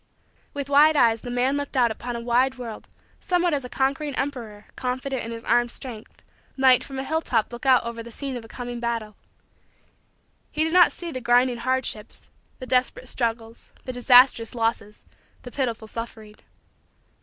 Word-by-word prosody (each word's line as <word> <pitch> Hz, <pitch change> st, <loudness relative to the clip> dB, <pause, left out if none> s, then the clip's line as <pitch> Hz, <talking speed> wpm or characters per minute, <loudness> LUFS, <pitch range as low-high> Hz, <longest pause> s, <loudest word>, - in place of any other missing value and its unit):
With 280 Hz, -1 st, -4 dB
wide 295 Hz, +2 st, +5 dB
eyes 230 Hz, -3 st, +4 dB
the 245 Hz, -, -7 dB
man 250 Hz, +3 st, +1 dB
looked 285 Hz, -1 st, -4 dB
out 240 Hz, -2 st, +4 dB
upon 240 Hz, +2 st, -5 dB
a 235 Hz, -, -4 dB
wide 245 Hz, +3 st, +2 dB
world 230 Hz, -4 st, -8 dB, 0.3 s
somewhat 355 Hz, -2 st, +1 dB
as 280 Hz, -2 st, -1 dB
a 250 Hz, -, -7 dB
conquering 275 Hz, +2 st, -1 dB
emperor, 230 Hz, -7 st, -4 dB
confident 255 Hz, +1 st, -3 dB
in 225 Hz, -, -6 dB
his 230 Hz, 0 st, -7 dB
armed 240 Hz, 0 st, +2 dB
strength, 235 Hz, -3 st, -8 dB, 0.3 s
might 260 Hz, -2 st, +5 dB
from 270 Hz, -, -8 dB
a 265 Hz, -, -2 dB
hilltop 265 Hz, -6 st, -1 dB
look 240 Hz, +3 st, -6 dB
out 255 Hz, -2 st, +5 dB
over 235 Hz, 0 st, -5 dB
the 235 Hz, -, -10 dB
scene 270 Hz, +3 st, -5 dB
of 240 Hz, -, -6 dB
a -, -, -12 dB
coming 245 Hz, +1 st, -6 dB
battle. 230 Hz, -3 st, -3 dB, 1.3 s
He 310 Hz, -, -1 dB
did 320 Hz, +1 st, -1 dB
not 360 Hz, -1 st, +7 dB
see 345 Hz, -1 st, -5 dB
the 255 Hz, -, -5 dB
grinding 245 Hz, +1 st, +3 dB
hardships, 250 Hz, -3 st, -3 dB, 0.3 s
the 255 Hz, -, -8 dB
desperate 255 Hz, 0 st, 0 dB
struggles, 230 Hz, -1 st, -3 dB
the 255 Hz, -, -5 dB
disastrous 245 Hz, -2 st, +5 dB
losses, 225 Hz, -2 st, -2 dB, 0.4 s
the 245 Hz, -, -9 dB
pitiful 235 Hz, -5 st, -3 dB
suffering. 220 Hz, -1 st, -8 dB
245 Hz, 175 wpm, -24 LUFS, 230-270 Hz, 1.3 s, not